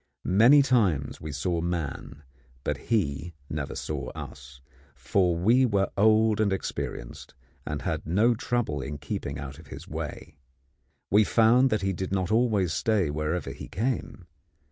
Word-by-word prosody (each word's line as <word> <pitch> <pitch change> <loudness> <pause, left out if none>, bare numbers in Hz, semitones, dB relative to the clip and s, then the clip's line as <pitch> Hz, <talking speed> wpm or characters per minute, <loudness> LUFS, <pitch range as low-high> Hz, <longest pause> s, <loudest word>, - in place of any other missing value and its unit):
Many 120 +10 +6
times 100 - +1
we 75 - -5
saw 85 +4 -1
man, 75 -4 -4 0.4
but - - -1
he 85 -7 0 0.2
never 75 -2 -4
saw - - -4
us; 65 -1 -10 0.4
for 90 +3 +1
we 115 +9 +4
were 100 -6 +1
old 110 +1 +4
and 105 -2 +2
experienced, 70 -10 -5 0.3
and 75 -3 -3
had - - -3
no 105 +8 +3
trouble 115 - -1
in 75 +2 -5
keeping 70 0 -5
out 70 +1 -7
of 80 - -14
his - - -10
way. 75 -3 -7 0.7
We 105 +3 +6
found 120 +5 +4
that 110 -4 0
he 95 0 0
did 95 +1 -4
not 95 -1 -1
always 110 -7 +2
stay 100 -4 +1
wherever 75 +4 -2
he - - -9
came. 115 -3 -3
95 Hz, 150 wpm, -27 LUFS, 75-110 Hz, 0.7 s, Many